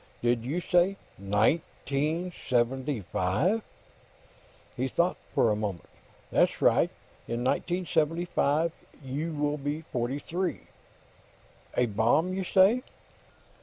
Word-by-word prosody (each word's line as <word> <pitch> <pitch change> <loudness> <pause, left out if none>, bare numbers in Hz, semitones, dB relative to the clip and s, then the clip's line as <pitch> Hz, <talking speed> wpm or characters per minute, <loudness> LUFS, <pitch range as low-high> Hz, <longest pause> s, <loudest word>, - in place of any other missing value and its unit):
"Did 120 -1 +2
you 150 +9 -2
say 180 +2 +3 0.2
nineteen 145 - 0 0.2
seventy 130 +1 +1
five?" 105 - +1 1.1
He 130 +2 -1
thought 170 +6 +1 0.2
for 115 - +4
a - - +2
moment. 105 -5 -4 0.4
"That's - - +3
right; - - +4 0.4
in 120 +1 -2
1975, 165 0 +1 0.3
you 145 +6 -3
will 150 -1 -1
be 145 +3 -3
forty 125 -3 -2
three. 175 +5 -3 1.2
A 125 - +4
bomb, 120 - +2
you 190 0 -2
say?" 195 +7 +4
145 Hz, 105 wpm, -28 LUFS, 120-175 Hz, 1.2 s, for